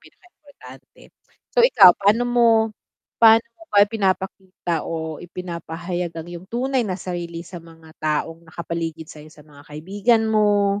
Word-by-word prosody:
pinaka-importante. 285 - -18 0.6
So, 485 - +6
ikaw 195 - +7
paano 205 +4 +2
mo 240 -1 +3 0.7
paano 225 0 +7
mo 335 - -19
ba 205 0 +6
ipinapakita 190 -3 -3
o 160 -1 -5
ipinapahayag 175 0 -6
ang 165 +1 -7
yung 175 +1 -9
tunay 260 +3 -1
na 185 -4 -3
sarili 170 -2 -5
sa 175 0 -10
mga 165 -1 -17
taong 155 +2 -2
nakapaligid 165 -1 -5
sa'yo 155 0 -12
sa 150 -1 -18
mga 145 -2 -17
kaibigan 200 +9 0
mo, 205 -2 +2
180 Hz, 140 wpm, -21 LUFS, 165-210 Hz, 0.7 s, ikaw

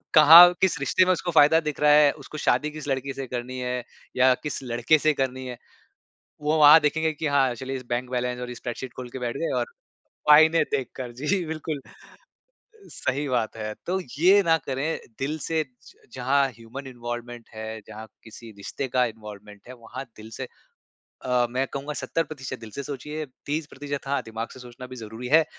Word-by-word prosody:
कहाँ 165 +4 +10
किस 185 -5 +2
रिश्ते 180 +6 +3
में 185 - +3
उसको 175 0 -1
फ़ायदा 155 +1 +6
दिख 150 -2 -4
रहा 150 0 +5
है, 150 -1 +6
उसको 155 +1 -10
शादी 150 +1 +1
किस 150 -1 -8
लड़की 135 0 -2
से 135 0 -5
करनी 125 +1 -5
है 125 -1 -3 0.3
या 130 0 +6
किस 150 -2 -4
लड़के 120 +5 +2
से 155 - +5
करनी 130 -1 -2
है। 125 -1 -7 0.8
वो 150 +2 +1
वहाँ 150 +1 +9
देखेंगे 160 +2 +1
की 155 +1 -5
हाँ 135 -3 +3
चलिए 130 +3 -5
इस 130 - -9
बैंक 120 +1 -2
बैलेंस 125 0 -2
और 125 0 -5
स्प्रेडशीट 120 +1 -6
ख़ोल 125 -1 -7
के 130 - -7
बैठ 120 +2 -3
गए 165 - -2
और - - 0 0.6
फायदे 160 +2 +7
देख 135 -3 -1
कर 125 -2 -6
जी 180 +4 0
बिल्कुल 155 -2 -4 1.1
सही 140 +3 -2
बात 120 -4 -1
है। 110 -1 -4
तो 185 +2 0 0.2
ये 195 +4 +6
ना 165 0 +5
करें 140 +5 -2 0.2
दिल 150 +4 -2
से 160 -1 0
ज 125 -3 -21 0.2
जहाँ 135 +2 +2
ह्यूमन 115 +5 -10
इन्वॉल्वमेंट 120 -1 -7
है 110 0 -6
जहाँ 110 +1 -9 0.2
किसी 115 0 -12
रिश्ते 100 +7 -5
का 125 0 +2
इन्वॉल्वमेंट 105 -2 -10
है 130 - -9
वहाँ 125 +3 -9
दिल 110 +1 -11
से - - -6 0.8
अ, 125 -1 +2
मैं 130 +2 -1
कहूँगा 140 +2 -4
70% 150 -2 -4
दिल 110 - -10
से 140 - -3
सोचिए 150 +3 -5 0.2
30% 145 -2 -4
हाँ 140 - 0
दिमाग़ 115 +1 -5
से 130 - -12
सोचना 125 +1 -10
भी 130 - -10
ज़रूरी 115 +1 -8
है। 160 0 +6
130 Hz, 190 wpm, -25 LUFS, 120-150 Hz, 1.1 s, कहाँ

